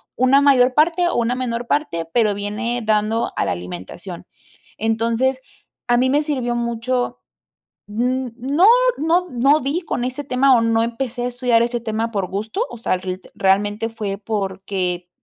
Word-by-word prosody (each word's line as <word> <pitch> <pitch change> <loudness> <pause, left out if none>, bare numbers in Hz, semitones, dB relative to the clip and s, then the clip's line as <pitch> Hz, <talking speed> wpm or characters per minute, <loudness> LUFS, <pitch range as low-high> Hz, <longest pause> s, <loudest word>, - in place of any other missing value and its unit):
una 260 +2 +4
mayor 260 -3 +5
parte 340 +3 +3
o - - -2
una 235 +1 +1
menor 245 -2 -3
parte, 170 - -1
pero 220 -4 +3
viene 210 +4 -3
dando 215 +2 0
a - - +1
la - - -1
alimentación. 90 +1 -8 0.5
Entonces, 230 +4 0 0.5
a 240 0 +3
mí 255 +2 +2
me 290 +3 +2
sirvió 255 -5 -1
mucho 240 +1 -2 0.7
Mm, 250 +4 -1
no, 280 +9 +2 0.3
no 340 +4 +2
no 275 +4 +3
di 280 +6 -1
con 280 -7 -3
ese 255 +3 -4
tema 260 0 +4
o - - +3
no 230 0 +2
empecé 240 +1 -3
a - - 0
estudiar 245 -2 +2
ese 240 +1 -1
tema 225 0 -2
por 200 -4 -2
gusto, 215 - -3
o 240 - -8
sea, 220 - 0
el 185 0 -4 0.2
realmente 205 +3 +1
fue 205 -3 -4
porque 190 -3 -3
235 Hz, 165 wpm, -20 LUFS, 210-260 Hz, 0.7 s, mayor